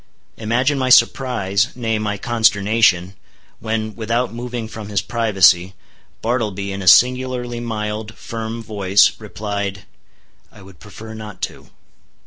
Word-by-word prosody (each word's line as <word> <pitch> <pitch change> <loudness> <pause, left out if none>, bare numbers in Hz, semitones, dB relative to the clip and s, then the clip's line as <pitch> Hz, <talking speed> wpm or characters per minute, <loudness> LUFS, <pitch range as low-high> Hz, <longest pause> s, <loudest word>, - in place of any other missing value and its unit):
Imagine 125 +6 0
my 130 -1 0
surprise, 115 -5 +3
nay, 115 -3 -1
my 105 -1 -2
consternation, 105 -4 +2 0.5
when 110 -1 -3
without 115 +2 -1
moving 120 -1 -5
from 110 -1 -9
his 100 -2 0
privacy, 95 -4 +2 0.5
Bartleby 105 -4 -2
in 100 0 -5
a 90 - -6
singularly 125 +2 +3
mild, 110 -1 -5
firm 115 -1 -6
voice, 100 -3 +3
replied, 100 -2 -5 0.7
"I 100 - -16
would 95 -4 -16
prefer 110 +2 -11
not 105 -3 -9
to." - - -6
110 Hz, 120 wpm, -19 LUFS, 100-115 Hz, 0.7 s, surprise